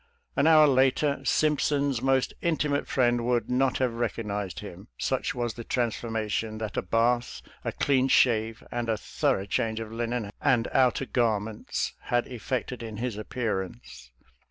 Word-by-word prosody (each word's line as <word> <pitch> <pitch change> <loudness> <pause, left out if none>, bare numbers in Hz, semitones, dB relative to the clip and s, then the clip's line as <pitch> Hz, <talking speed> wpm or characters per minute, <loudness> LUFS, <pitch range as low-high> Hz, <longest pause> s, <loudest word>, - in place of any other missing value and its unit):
An 140 - +3
hour 155 -1 +8
later 135 +1 +3
Simpson's 145 -3 +1
most 135 0 +2
intimate 150 -4 0
friend 120 -2 +2
would 120 -1 0
not 130 +1 +2
have 125 -3 0
recognized 105 -4 -3
him, 100 0 -10
such 130 0 -1
was 120 -2 -2
the 115 - -8
transformation 115 -2 -2
that 110 -2 -5
a - - +1
bath, 115 +5 0 0.2
a - - -2
clean 135 -2 +2
shave, 115 -4 +3
and 120 -1 -2
a 110 - +1
through 95 -1 0
change 110 +2 -1
of 110 -1 -6
linen 115 -2 -3
and 125 -4 +3
outer 130 0 +3
garments 110 -4 -1
had 120 0 +1
effected 125 0 -4
in 110 -2 -6
his 120 -1 -3
appearance. 95 - -4
120 Hz, 150 wpm, -27 LUFS, 110-130 Hz, 0.2 s, hour